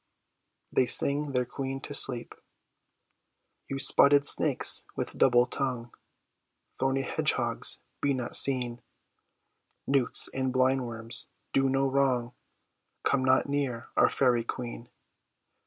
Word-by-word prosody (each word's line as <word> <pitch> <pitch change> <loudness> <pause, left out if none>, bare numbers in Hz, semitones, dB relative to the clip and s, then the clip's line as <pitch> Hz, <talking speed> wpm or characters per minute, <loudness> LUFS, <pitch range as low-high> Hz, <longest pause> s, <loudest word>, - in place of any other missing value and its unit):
They 130 - +1
Sing 140 +2 +1
Their 125 -1 0
Queen 135 +1 -6
to 145 - -8
Sleep, 125 -4 +2 1.4
You 135 - -4
spotted 140 +1 +4
snakes - - +4
with - - -5
double 120 -2 +3
tongue, 125 -2 -5 0.9
Thorny 135 +1 -1
hedgehogs, - - -1 0.2
be 140 -1 0
not 125 -2 -4
seen; 125 -3 +3 1.0
Newts 135 -3 +2
and 130 -1 -2
blind 130 0 0
worms, 115 0 0 0.2
do 135 0 +1
no 135 +1 0
wrong; 130 -3 -1 0.7
Come 140 -2 0
not 130 +1 +2
near 135 -5 -4
our - - +3
fairy 125 -3 0
queen. 120 0 -8
130 Hz, 115 wpm, -27 LUFS, 120-135 Hz, 1.4 s, spotted